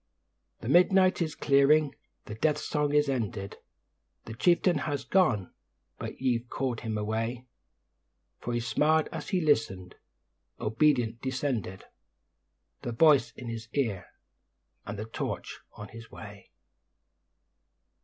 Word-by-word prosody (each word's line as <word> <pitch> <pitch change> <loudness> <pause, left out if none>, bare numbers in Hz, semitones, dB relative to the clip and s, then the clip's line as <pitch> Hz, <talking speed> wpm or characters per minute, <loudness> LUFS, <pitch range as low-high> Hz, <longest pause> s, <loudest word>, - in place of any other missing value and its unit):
The - - -6
midnight 185 +5 +4
is 160 -2 -1
clearing; 140 +1 +4 0.3
the 105 - -7
Death 150 +7 +1
song 150 -1 -1
is 150 0 +3
ended. 110 -7 -3 0.7
The 115 - -7
Chieftain 170 - +3
has 145 -1 -3
gone, 120 - +2 0.5
but - - -6
ye've 120 -2 0
called 130 -4 -2
him 110 -2 -3
away; 115 +4 -2 0.9
For 120 - -4
he 120 - 0
smiled 150 +7 +2
as - - -6
he 190 - +1
listened, 95 - 0 0.7
obedient 115 0 +1
ascended, 130 -8 -2 1.0
The 120 - -4
voice 135 -3 +5
in 125 - -9
his 115 -1 -6
ear, 115 -10 -1 0.8
and 105 +1 -5
the 105 - -4
torch 110 - -5
on 105 -1 -9
his 115 +1 -11
way. 100 -1 -11
125 Hz, 125 wpm, -29 LUFS, 110-150 Hz, 1.0 s, voice